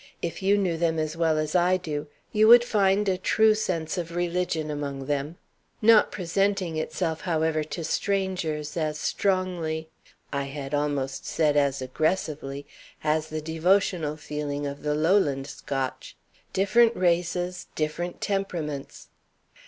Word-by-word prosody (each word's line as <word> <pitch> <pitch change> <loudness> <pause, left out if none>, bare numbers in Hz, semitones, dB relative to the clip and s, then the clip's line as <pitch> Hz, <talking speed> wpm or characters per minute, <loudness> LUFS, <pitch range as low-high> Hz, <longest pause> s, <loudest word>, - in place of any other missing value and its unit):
"If 170 - -3
you 200 +2 +3
knew 180 -5 0
them 165 -1 +1
as 155 0 -2
well 165 -2 +2
as 155 0 -1
I 180 +1 +4
do, 155 -4 -4 0.2
you 215 +1 +4
would 240 +1 +9
find 205 -3 +2
a 185 -1 +1
true 220 +3 +4
sense 180 -5 -2
of 170 0 -5
religion 175 -3 -1
among 140 -2 -4
them; 145 +4 -2 0.4
not 225 0 +6
presenting 190 -1 0
itself, 160 +1 -2
however, 160 -3 0
to 165 +2 -5
strangers 170 -5 -1
as 155 -2 -1
strongly 175 -4 -1 0.4
I 140 0 -1
had 140 0 -6
almost 145 -2 -1
said 150 -1 +2
as 140 -2 +2
aggressively 145 -1 -2 0.4
as 155 0 +1
the 155 0 -4
devotional 160 -1 +1
feeling 145 -1 -4
of 140 0 -5
the 150 0 0
Lowland 155 -4 +2
Scotch. 135 -2 -5 0.3
Different 225 +5 +4
races, 175 0 0
different 165 +3 -3
temperaments." 170 -8 -3
160 Hz, 135 wpm, -26 LUFS, 150-185 Hz, 0.4 s, would